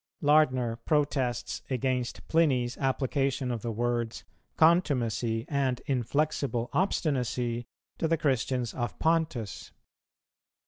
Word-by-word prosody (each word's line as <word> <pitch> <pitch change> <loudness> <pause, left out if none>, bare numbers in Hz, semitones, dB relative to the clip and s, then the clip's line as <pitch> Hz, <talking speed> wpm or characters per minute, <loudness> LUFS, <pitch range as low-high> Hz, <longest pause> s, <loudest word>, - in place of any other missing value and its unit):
Lardner 130 -6 +3
protests 140 -5 0
against 130 -1 -2
Pliny's 130 -7 +2
application 135 -1 0
of 115 -3 -3
the 120 - -3
words 120 0 -2 0.3
"contumacy 125 -9 +2
and 135 -4 0
inflexible 135 -2 -1
obstinacy" 125 - 0 0.3
to 165 - +1
the 165 0 +2
Christians 130 -4 0
of 120 -1 -3
Pontus. 160 -9 -1
130 Hz, 95 wpm, -29 LUFS, 120-150 Hz, 0.3 s, Lardner